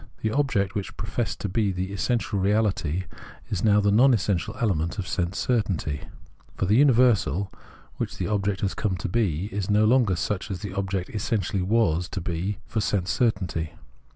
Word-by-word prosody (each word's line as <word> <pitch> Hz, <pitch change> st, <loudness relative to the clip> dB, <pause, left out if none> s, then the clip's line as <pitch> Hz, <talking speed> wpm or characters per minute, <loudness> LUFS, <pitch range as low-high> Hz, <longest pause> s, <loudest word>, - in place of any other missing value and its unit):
The 110 Hz, -, +1 dB
object, 115 Hz, -7 st, +1 dB
which 100 Hz, -3 st, -5 dB
pro -, -, -5 dB
fessed -, -, -2 dB
to -, -, -1 dB
be 100 Hz, +1 st, +1 dB
the 95 Hz, +1 st, -3 dB
essential 110 Hz, 0 st, 0 dB
reahty, 95 Hz, -4 st, +1 dB, 0.5 s
is 100 Hz, -3 st, -1 dB
now 105 Hz, -2 st, +5 dB
the 100 Hz, 0 st, +2 dB
non 125 Hz, +5 st, +6 dB
essential 95 Hz, -5 st, -1 dB
element 95 Hz, -, 0 dB
of 95 Hz, -3 st, -3 dB
sense 90 Hz, +1 st, -1 dB
certainty; 95 Hz, -, 0 dB, 0.6 s
for -, -, 0 dB
the 100 Hz, -, +2 dB
universal, 120 Hz, -, +4 dB, 0.5 s
which -, -, -3 dB
the -, -, -2 dB
object 100 Hz, -2 st, -1 dB
has 100 Hz, -, 0 dB
come 95 Hz, -4 st, -1 dB
to -, -, -3 dB
be, 95 Hz, -5 st, 0 dB
is 100 Hz, -1 st, -3 dB
no 105 Hz, +1 st, +4 dB
longer 115 Hz, -5 st, +4 dB
such 95 Hz, +3 st, -2 dB
as 95 Hz, -3 st, -4 dB
the 100 Hz, -2 st, -5 dB
object 95 Hz, -1 st, -2 dB
essentially 105 Hz, -2 st, -1 dB
was 90 Hz, -4 st, +1 dB
to 95 Hz, -, -4 dB
be 90 Hz, +3 st, -2 dB
for 110 Hz, -, -2 dB
sense 95 Hz, -3 st, 0 dB
certainty. 90 Hz, -9 st, 0 dB
100 Hz, 180 wpm, -25 LUFS, 90-110 Hz, 0.6 s, non